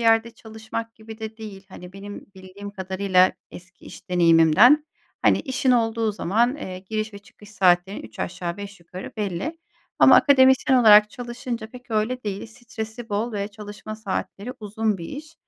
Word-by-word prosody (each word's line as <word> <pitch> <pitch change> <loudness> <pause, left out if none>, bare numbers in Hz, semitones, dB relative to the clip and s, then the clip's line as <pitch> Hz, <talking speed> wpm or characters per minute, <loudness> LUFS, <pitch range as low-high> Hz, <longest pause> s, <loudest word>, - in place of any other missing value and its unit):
yerde 225 0 +3
çalışmak 225 0 -7
gibi 220 0 -12
de 220 0 -7
değil. 205 -4 -10
Hani, 180 -1 -11
benim 200 +1 -9
bildiğim 190 +2 -10
kadarıyla 190 -1 +2 0.2
eski 180 0 -14
iş - - -13
deneyimimden, 175 - +5 0.4
hani, - - +4
işin 260 0 0
olduğu 225 -2 +1
zaman, 230 +7 +1
eee, 185 -10 -7
giriş 215 +3 -4
ve - - -8
çıkış 205 0 -18
saatlerin 185 -1 +2
üç 110 0 -13
aşağı 175 -1 -4
beş 200 -2 -9
yukarı 180 +2 -9
belli 210 - -3 0.4
ama - - +8
akademisyen 265 -1 +5
olarak 210 -3 +7
çalışınca 240 -1 -6
pek 250 0 -14
öyle 225 +4 -1
değil. 200 -1 -4
Stresi 225 0 -8
bol 215 +4 -2
ve 200 -1 -3
çalışma 210 0 -9
saatleri 215 +2 -5
uzun 215 0 -2
bir 170 - -7
iş. 310 +3 -9
215 Hz, 160 wpm, -23 LUFS, 190-230 Hz, 0.4 s, ama